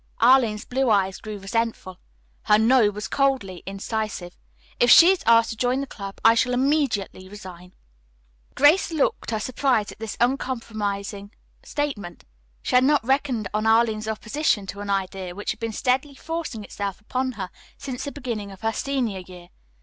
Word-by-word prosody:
Arline's 235 Hz, -3 st, +4 dB
blue 260 Hz, 0 st, 0 dB
eyes 195 Hz, -3 st, +2 dB
grew 215 Hz, -1 st, -7 dB
resentful. 195 Hz, -2 st, -3 dB, 0.5 s
Her 210 Hz, -, +5 dB
"no" 225 Hz, 0 st, +4 dB
was 210 Hz, +1 st, -5 dB
coldly 260 Hz, -10 st, 0 dB
incisive. 195 Hz, -2 st, -4 dB, 0.4 s
"If 240 Hz, -, +4 dB
she 340 Hz, +8 st, +9 dB
is 380 Hz, -, 0 dB
asked 230 Hz, 0 st, +5 dB
to -, -, -5 dB
join 250 Hz, +3 st, 0 dB
the 275 Hz, -, -2 dB
club, 200 Hz, -6 st, -8 dB
I 225 Hz, -, +8 dB
shall 250 Hz, +2 st, +1 dB
immediately 250 Hz, -9 st, 0 dB
resign." 185 Hz, -3 st, -11 dB, 0.8 s
Grace 300 Hz, +7 st, +4 dB
looked 315 Hz, -4 st, 0 dB
her 220 Hz, -2 st, -1 dB
surprise 250 Hz, -2 st, 0 dB
at -, -, -14 dB
this 225 Hz, -1 st, -6 dB
uncompromising 215 Hz, -5 st, -2 dB, 0.3 s
statement. 225 Hz, -, -4 dB, 0.4 s
She -, -, -3 dB
had 250 Hz, 0 st, +6 dB
not 285 Hz, -2 st, +3 dB
reckoned 260 Hz, -5 st, 0 dB
on 215 Hz, +1 st, 0 dB
Arline's 220 Hz, -1 st, +2 dB
opposition 220 Hz, 0 st, -1 dB
to 200 Hz, -, -11 dB
an 205 Hz, -, -6 dB
idea 190 Hz, -2 st, -2 dB
which 205 Hz, -, -3 dB
had -, -, -8 dB
been 230 Hz, -1 st, -3 dB
steadily 260 Hz, +5 st, 0 dB
forcing 320 Hz, -8 st, -5 dB
itself 200 Hz, -1 st, -5 dB
upon 255 Hz, +4 st, -2 dB
her 190 Hz, -5 st, -6 dB, 0.3 s
since 260 Hz, -3 st, -6 dB
the 285 Hz, -, -4 dB
beginning 225 Hz, -7 st, -5 dB
of 195 Hz, -, -13 dB
her 225 Hz, 0 st, 0 dB
senior 250 Hz, -9 st, -2 dB
year. 180 Hz, -1 st, -12 dB
225 Hz, 165 wpm, -24 LUFS, 200-260 Hz, 0.8 s, she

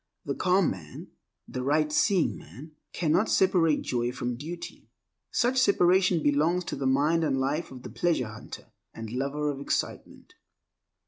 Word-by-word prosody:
The -, -, -1 dB
calm 185 Hz, 0 st, +2 dB
man, 80 Hz, -6 st, -9 dB, 0.4 s
the 130 Hz, -, -5 dB
right 150 Hz, +3 st, +1 dB
seeing 185 Hz, +3 st, +2 dB
man, 130 Hz, -, -12 dB, 0.2 s
cannot 175 Hz, +5 st, +1 dB
separate 175 Hz, -5 st, +3 dB
joy 120 Hz, 0 st, -1 dB
from 125 Hz, -1 st, -3 dB
duty. 165 Hz, +7 st, -8 dB, 0.4 s
Such 255 Hz, +2 st, +1 dB
separation 185 Hz, -, +3 dB
belongs 155 Hz, +5 st, +2 dB
to -, -, -4 dB
the 135 Hz, -, -2 dB
mind 150 Hz, +5 st, +2 dB
and 135 Hz, -4 st, 0 dB
life 145 Hz, +5 st, -1 dB
of 130 Hz, -1 st, -11 dB
the -, -, -8 dB
pleasure 160 Hz, -10 st, 0 dB
hunter 110 Hz, +1 st, -10 dB, 0.2 s
and 115 Hz, -1 st, -7 dB
lover 140 Hz, +4 st, -1 dB
of 135 Hz, -, -7 dB
excitement. 140 Hz, -, -4 dB
150 Hz, 150 wpm, -27 LUFS, 130-175 Hz, 0.4 s, separate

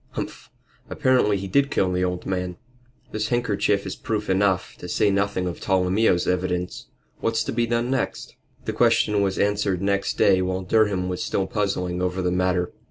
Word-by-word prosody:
Humph! -, -, -6 dB, 0.4 s
Evidently 125 Hz, -6 st, +2 dB
he 95 Hz, 0 st, -5 dB
did 140 Hz, +8 st, +2 dB
kill 95 Hz, -9 st, +1 dB
the 90 Hz, 0 st, 0 dB
old 90 Hz, -1 st, -2 dB
man 90 Hz, -2 st, -3 dB, 0.5 s
this 110 Hz, 0 st, -2 dB
handkerchief 105 Hz, -4 st, 0 dB
is 95 Hz, -, -4 dB
proof 105 Hz, -3 st, -2 dB
enough, 95 Hz, -1 st, +1 dB
to 90 Hz, -, -8 dB
say 105 Hz, +2 st, +2 dB
nothing 100 Hz, -1 st, 0 dB
of 90 Hz, -, -4 dB
Tolomeo's 95 Hz, 0 st, +2 dB
evidence. 90 Hz, 0 st, -2 dB, 0.3 s
What's 115 Hz, 0 st, 0 dB
to -, -, -3 dB
be 115 Hz, 0 st, 0 dB
done 120 Hz, +2 st, 0 dB
next?" 135 Hz, -, -2 dB, 0.3 s
The -, -, -2 dB
question 105 Hz, -1 st, +3 dB
was 95 Hz, -1 st, 0 dB
answered 100 Hz, -2 st, +1 dB
next 100 Hz, 0 st, 0 dB
day 95 Hz, -1 st, +4 dB
while 95 Hz, 0 st, -2 dB
Durham 100 Hz, -2 st, +2 dB
was 90 Hz, -1 st, -3 dB
still 95 Hz, -, -1 dB
puzzling 95 Hz, -3 st, -2 dB
over 90 Hz, 0 st, -1 dB
the 90 Hz, -, +1 dB
matter. 90 Hz, -1 st, 0 dB
95 Hz, 175 wpm, -24 LUFS, 90-105 Hz, 0.5 s, day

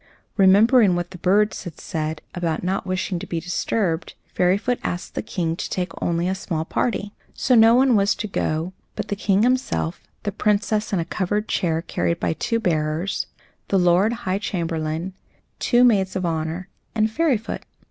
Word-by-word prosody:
Remembering 205 Hz, +1 st, +6 dB
what 175 Hz, 0 st, -3 dB
the 185 Hz, -, -10 dB
birds 205 Hz, +4 st, +2 dB
had 170 Hz, -4 st, -8 dB
said 155 Hz, -2 st, -4 dB
about 170 Hz, -2 st, -2 dB
not 190 Hz, +2 st, -1 dB
wishing 185 Hz, -1 st, -1 dB
to -, -, -7 dB
be 170 Hz, -, -2 dB
disturbed, 180 Hz, 0 st, -1 dB, 0.2 s
Fairyfoot 200 Hz, +7 st, +1 dB
asked 175 Hz, +1 st, -4 dB
the -, -, -2 dB
King 165 Hz, -3 st, -2 dB
to -, -, -5 dB
take 180 Hz, -2 st, -2 dB
only 170 Hz, +1 st, 0 dB
a 190 Hz, -, +1 dB
small 170 Hz, -4 st, -3 dB
party. 205 Hz, +1 st, -1 dB, 0.2 s
So 255 Hz, -, +1 dB
no 225 Hz, 0 st, +7 dB
one 255 Hz, -1 st, +5 dB
was 200 Hz, 0 st, +3 dB
to 215 Hz, -, -4 dB
go 165 Hz, -2 st, -2 dB, 0.2 s
but -, -, -4 dB
the 205 Hz, -, 0 dB
King 200 Hz, +1 st, +2 dB
himself, 250 Hz, -8 st, 0 dB, 0.2 s
the 205 Hz, -, -1 dB
Princess, 210 Hz, +2 st, 0 dB
in 200 Hz, -, +1 dB
a 165 Hz, -, -1 dB
covered 205 Hz, +4 st, -1 dB
chair 165 Hz, -3 st, 0 dB
carried 170 Hz, 0 st, -1 dB
by -, -, 0 dB
two 230 Hz, +7 st, -1 dB
bearers, 160 Hz, -1 st, -1 dB, 0.4 s
the 195 Hz, -, +2 dB
Lord 180 Hz, +4 st, +4 dB
High 190 Hz, 0 st, 0 dB
Chamberlain, 165 Hz, -2 st, -2 dB, 0.5 s
two 245 Hz, 0 st, +4 dB
Maids 195 Hz, -6 st, +3 dB
of 185 Hz, -1 st, -1 dB
Honour, 165 Hz, +2 st, -2 dB, 0.3 s
and 220 Hz, 0 st, +2 dB
Fairyfoot. 265 Hz, -6 st, 0 dB
190 Hz, 175 wpm, -23 LUFS, 170-210 Hz, 0.5 s, no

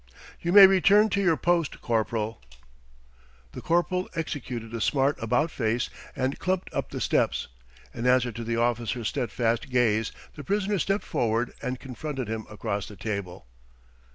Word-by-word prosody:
"You 170 Hz, -, -1 dB
may 200 Hz, +1 st, +11 dB
return 200 Hz, +3 st, +5 dB
to 200 Hz, 0 st, 0 dB
your 170 Hz, -5 st, +3 dB
post, 170 Hz, 0 st, 0 dB
corporal." 110 Hz, -, -1 dB, 1.1 s
The -, -, -8 dB
corporal 175 Hz, +2 st, 0 dB
executed 125 Hz, -8 st, -4 dB
a 115 Hz, -, -3 dB
smart 135 Hz, +4 st, +2 dB
about 145 Hz, +8 st, +1 dB
face 115 Hz, -2 st, -1 dB, 0.2 s
and 135 Hz, 0 st, -1 dB
clumped 185 Hz, 0 st, -2 dB
up -, -, -2 dB
the -, -, -5 dB
steps. -, -, 0 dB, 0.4 s
In 120 Hz, -, -2 dB
answer 125 Hz, -1 st, +3 dB
to 115 Hz, +2 st, -6 dB
the 115 Hz, 0 st, -2 dB
officer's 120 Hz, -1 st, 0 dB
steadfast 120 Hz, +3 st, -1 dB
gaze 115 Hz, -4 st, +2 dB, 0.2 s
the 145 Hz, -, -9 dB
prisoner 205 Hz, +4 st, 0 dB
stepped 195 Hz, +4 st, 0 dB
forward 115 Hz, +1 st, 0 dB
and 125 Hz, 0 st, -3 dB
confronted 135 Hz, -1 st, -5 dB
him 110 Hz, 0 st, -4 dB
across 100 Hz, -1 st, -3 dB
the 105 Hz, -, -10 dB
table. 95 Hz, -, -5 dB
125 Hz, 155 wpm, -26 LUFS, 115-170 Hz, 1.1 s, may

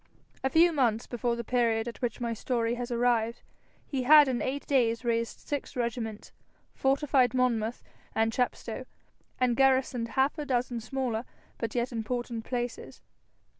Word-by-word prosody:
A 265 Hz, -, +2 dB
few 335 Hz, +5 st, +5 dB
months 240 Hz, -5 st, +1 dB
before 240 Hz, -1 st, -1 dB
the 235 Hz, -, -4 dB
period 230 Hz, -1 st, +1 dB
at 235 Hz, -, -7 dB
which 240 Hz, -3 st, -2 dB
my 235 Hz, -1 st, -1 dB
story 230 Hz, 0 st, -1 dB
has 245 Hz, 0 st, -4 dB
arrived, 235 Hz, -1 st, +1 dB, 0.4 s
he 270 Hz, -3 st, -2 dB
had 295 Hz, +3 st, +8 dB
in 250 Hz, -2 st, -1 dB
eight 275 Hz, +2 st, -2 dB
days 240 Hz, -3 st, +1 dB
raised 230 Hz, -1 st, -1 dB
six 290 Hz, -2 st, -4 dB
regiments, 235 Hz, -3 st, -3 dB, 0.4 s
fortified 270 Hz, -2 st, +2 dB
Monmouth 240 Hz, -2 st, 0 dB, 0.3 s
and 225 Hz, 0 st, +2 dB
Chepstow, 250 Hz, +1 st, -2 dB, 0.5 s
and 250 Hz, -2 st, +2 dB
garrisoned 260 Hz, -2 st, +2 dB
half 275 Hz, +4 st, +2 dB
a 300 Hz, -, -3 dB
dozen 245 Hz, -2 st, 0 dB
smaller 245 Hz, -1 st, -2 dB, 0.4 s
but 230 Hz, -1 st, -3 dB
yet 240 Hz, +1 st, 0 dB
important 235 Hz, 0 st, -3 dB
places. 245 Hz, -1 st, -4 dB
245 Hz, 150 wpm, -29 LUFS, 230-260 Hz, 0.5 s, had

